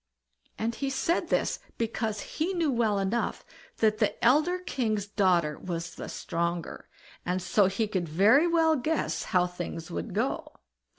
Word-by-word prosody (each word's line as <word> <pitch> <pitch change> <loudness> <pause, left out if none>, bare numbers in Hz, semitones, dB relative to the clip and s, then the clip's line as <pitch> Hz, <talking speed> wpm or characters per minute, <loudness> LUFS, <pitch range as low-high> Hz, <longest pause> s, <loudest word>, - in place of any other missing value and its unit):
And 225 +2 -1
he 275 +3 -2
said 270 +6 0
this - - +1 0.2
because 220 -2 -2
he 335 - -2
knew 335 -5 +1
well 225 -4 +1
enough 195 +4 -1 0.3
that 215 -1 +2
the - - +2
elder 305 +9 +4
king's 230 - -1
daughter 180 -7 +1
was 170 -2 -4
the - - -7
stronger, 170 0 -3 0.3
and 180 +1 -1
so 190 +2 +3
he 200 +3 0
could 185 -5 -2
very 215 - +5
well 325 -2 +4
guess 255 - -1
how 180 -1 +2
things 175 -2 -6
would 85 0 -4
go. - - -1
215 Hz, 155 wpm, -28 LUFS, 180-270 Hz, 0.3 s, very